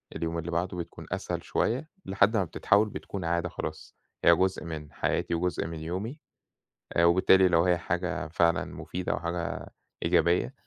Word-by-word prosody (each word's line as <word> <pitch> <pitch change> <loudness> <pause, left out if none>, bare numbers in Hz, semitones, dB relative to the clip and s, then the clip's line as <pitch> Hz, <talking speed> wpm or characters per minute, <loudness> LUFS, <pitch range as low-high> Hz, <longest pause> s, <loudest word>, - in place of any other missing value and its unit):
اليوم 85 0 -2
اللي 85 +1 -4
بعده، 90 +2 -1
بتكون 85 - -7
أسهل - - -3
شوية 130 +7 -1 0.2
لحد 100 +3 +3
ما 100 - +3
بتتحوّل 100 +5 +2
بتكون 95 -2 -6
عادة 85 +1 0
خلاص، - - -6 0.3
هي - - +7
جزء 95 -3 0
من 75 -3 -6
حياتي - - 0
وجزء 90 0 -1
من 80 -1 -6
يومي. 95 - -4 0.7
آآ 85 - +4
وبالتالي 95 +2 +6
ولو 85 -2 +4
هي 90 -1 +3
حاجة 90 +1 -2
فعلًا 85 +1 +2
مفيدة 90 0 -4
وحاجة 85 0 -4 0.3
إيجابية 85 +7 +2
85 Hz, 160 wpm, -28 LUFS, 85-95 Hz, 0.7 s, هي